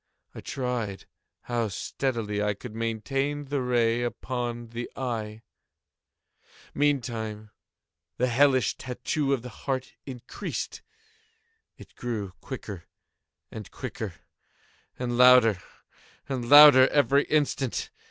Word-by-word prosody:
I - - -9
tried 120 -7 -4 0.4
how 120 -2 -1
steadily 105 0 -3
I 105 -1 0
could 115 +2 -10
maintain 135 +6 -2
the 140 0 -2
ray 120 -2 +1
upon 120 -1 -4
the 120 +1 -6
eve. 110 -4 -4 1.3
Meantime 115 -7 -1 0.7
the 125 - +2
hellish 130 +1 +3
tattoo 135 +3 -2
of 130 -4 0
the 125 - -7
heart 130 +2 -4
increased. 125 -3 -6 1.0
It - - -15
grew 110 -6 -4
quicker 105 -9 -7 0.7
and 110 -2 -8
quicker, 110 -7 -6 0.8
and 120 -1 -3
louder 125 -6 +6 0.7
and 125 -3 -4
louder 145 -3 +10
every 140 0 +3
instant. 140 -4 -1
120 Hz, 105 wpm, -27 LUFS, 115-135 Hz, 1.3 s, louder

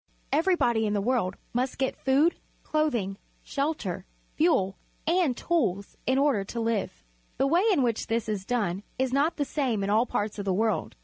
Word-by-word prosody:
Everybod}' 295 -9 +3
in 210 -1 0
the 205 - +1
world 200 -4 0 0.2
must 250 +2 -1
get 265 -1 0
food, 280 +6 +3 0.3
clothing, 240 -11 0 0.3
shelter, 275 - -2 0.3
fuel, 200 - +2 0.3
and 330 -6 +2
tools 200 - 0
in 260 +1 +3
order 275 -8 +3
to 230 +4 -5
live. 225 -2 -1 0.3
The 270 - +2
way 335 +6 +3
in 290 -9 +3
which 230 -3 0
this 225 -1 -1
is 210 -3 -2
done 200 -5 -1 0.2
is 260 -1 0
not 290 +5 +2
the 290 - 0
same 255 -9 -1
in 200 - 0
all 225 +4 +3
parts 205 0 -2
of 200 - -3
the 190 - +1
world. 220 +1 0
240 Hz, 180 wpm, -27 LUFS, 205-285 Hz, 0.3 s, Everybod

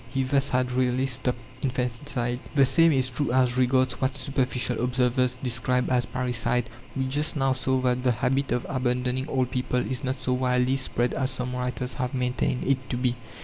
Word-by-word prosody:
He 135 +1 -1
thus 135 +1 +1
had 125 0 0
really 125 +1 +1
stopped 125 -1 0 0.2
infanticide. 125 -1 -2 0.2
The 140 -2 +6
same 165 +6 +5
is 130 -3 +2
true 140 +1 -1
as 125 -1 +2
regards 130 0 +2
what 130 +1 0
superficial 130 -3 -1
observers 125 0 +1
describe 125 +1 0
as 125 -2 +1
parricide. 125 -2 -1 0.2
We 135 -1 -1
just 145 +5 +2
now 135 -2 +2
saw 130 0 0
that 125 0 +1
the 125 -1 +2
habit 135 +4 0
of 125 - -1
abandoning 125 0 -1
old 130 -2 0
people 125 -1 -1
is 130 +2 -2
not 130 0 -1
so 125 - -1
widely 125 +1 +1
spread 125 -2 0
as 130 -1 0
some 125 -1 -2
writers 125 0 -2
have 125 0 -3
maintained 125 0 -1
it 130 -1 0
to 125 - -2
be. 125 -1 0
125 Hz, 190 wpm, -26 LUFS, 125-130 Hz, 0.2 s, The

